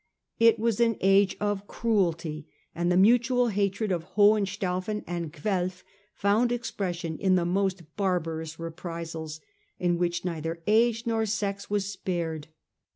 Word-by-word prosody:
It 230 0 +6
was 225 -1 0
an 230 -2 +3
age 195 0 +4
of 205 -1 -2
cruelty, 170 -9 -1 0.3
and 175 +1 0
the 180 - +3
mutual 245 +4 +4
hatred 200 0 0
of 175 0 -4
Hohenstaufen 205 -1 +2
and 170 -2 -4
Guelf 180 +2 -2 0.3
found 215 +5 +2
expression 180 -9 -3
in 190 -2 +3
the 175 -2 +2
most 180 -3 -1
barbarous 165 -5 -1
reprisals, 165 -2 -6 0.4
in 175 -1 0
which 175 0 -1
neither 165 -1 -3
age 230 +2 +3
nor 225 -1 0
sex 200 -1 -2
was 205 -1 0
spared. 170 -6 -3
190 Hz, 135 wpm, -27 LUFS, 170-210 Hz, 0.4 s, It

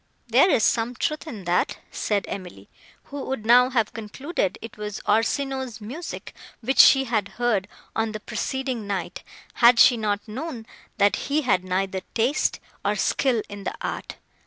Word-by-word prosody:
"There 260 +11 +5
is 225 - +3
some 235 +1 +1
truth 305 +5 -2
in 220 -10 -7
that," 175 0 0
said 205 -2 -1
Emily, 180 - -8 0.3
who 285 -1 -7
would 260 -5 -4
now 250 +2 +6
have 230 -5 0
concluded 225 - -3
it 230 - -9
was 210 -1 -5
Orsino's 265 +1 0
music, 265 +11 -7 0.3
which 260 +4 -1
she 270 -1 +8
had 225 -6 -1
heard, 230 -6 +1 0.3
on 225 0 0
the 215 - -5
preceding 240 +1 -3
night, 190 -3 -3 0.4
had 235 0 +8
she 245 0 +7
not 210 -1 -2
known, 240 +1 -6 0.3
that 205 0 +4
he 295 +2 +1
had 185 -8 +2
neither 190 +1 -1
taste, 245 +6 +1 0.2
nor 205 +1 +1
skill 225 +3 +1
in 205 -1 -9
the - - -3
art. - - -5
225 Hz, 160 wpm, -24 LUFS, 205-260 Hz, 0.4 s, she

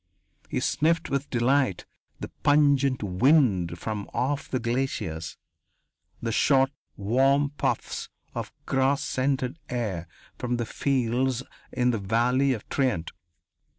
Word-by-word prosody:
He - - -1
sniffed 165 0 +1
with 140 +1 -1
delight 125 -4 +1 0.3
the - - -6
pungent 140 -4 +3
wind 100 - +3
from 105 +3 -4
off 135 +4 -1
the 130 - 0
glaciers, 115 -10 -2 0.8
the 115 - -2
short, 135 +3 +3 0.3
warm 135 +7 +2
puffs 145 - -2 0.2
of - - -5
grass 135 +1 +1
scented 130 +2 -1
air 100 -9 -3 0.3
from 125 -1 -1
the 120 - -1
fields 130 0 0 0.3
in 125 0 +2
the 115 - -1
Valley 120 +7 +2
of 115 -5 -4
Trient. 125 - 0
130 Hz, 120 wpm, -26 LUFS, 115-140 Hz, 0.8 s, pungent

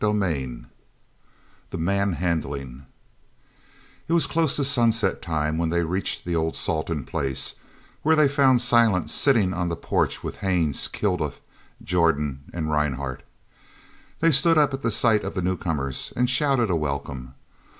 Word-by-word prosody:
CHAPTER 105 0 +2
XXX 70 -11 -3 1.0
"THE - - -5
MANHANDLING" 80 -8 -2 1.2
It 165 - -1
was 170 - +4
close 160 -3 +1
to 140 - +1
sunset 115 -4 +2
time 80 -2 -2
when 85 -1 0
they 85 +1 0
reached 90 +4 -3
the 85 -1 -2
old 80 0 -1
Salton 80 -3 -2
place, 65 -2 -2 0.5
where 160 +1 +3
they 155 -2 +5
found 135 -3 +3
Silent 115 -7 +3
sitting 110 -10 +3
on 90 -1 -2
the 85 - -2
porch - - -1
with - - -6
Haines, 85 -7 +1
Kilduff, - - -2 0.4
Jordan, 75 -5 0
and 80 -3 -3
Rhinehart. 70 -3 -2 1.0
They 165 0 +4
stood 160 +4 +5
up 145 -2 +3
at 135 -4 -2
sight 110 -1 +3
of - - -5
the 95 - -1
newcomers 80 -7 -2
and 125 +1 +1
shouted 125 -4 +2
a - - +2
welcome. 70 -4 -4
90 Hz, 145 wpm, -24 LUFS, 75-120 Hz, 1.2 s, they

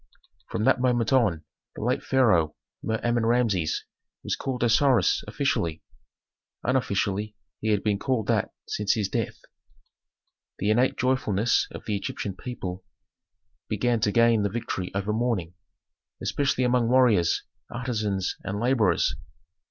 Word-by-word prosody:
From 110 - -2
that 125 - +3
moment 120 -1 +2
on, 105 -12 +2 0.3
the - - -6
late 125 +3 +1
pharaoh, 100 - +3 0.3
Mer 110 0 -1
Amen 120 -1 +1
Rameses, 115 -9 +1 0.4
was - - -1
called 125 -2 -3
"Osiris" 120 -2 +3
officially; 80 -1 -1 0.8
unofficially, 105 -4 0 0.2
he 110 - -4
had 105 -2 +1
been 105 -2 +1
called 125 -4 0
that - - +1 0.2
since 105 -1 0
his 105 -3 0
death. - - -2 1.2
The 105 +3 +1
innate 125 +4 +2
joyfulness 120 -4 +1
of - - -10
the 105 - -1
Egyptian 100 -1 -4
people 95 -6 -6 0.9
began 115 +2 +1
to 105 -1 +1
gain 115 0 +4
the 100 - +1
victory 95 -4 -4
over 100 +2 -1
mourning, 110 -7 -1 0.7
especially 130 -3 0
among 125 -1 +2
warriors, 115 -9 +3 0.3
artisans, 110 -6 -2
and 100 +1 -3
laborers. 115 -8 +2
110 Hz, 130 wpm, -26 LUFS, 100-125 Hz, 1.2 s, gain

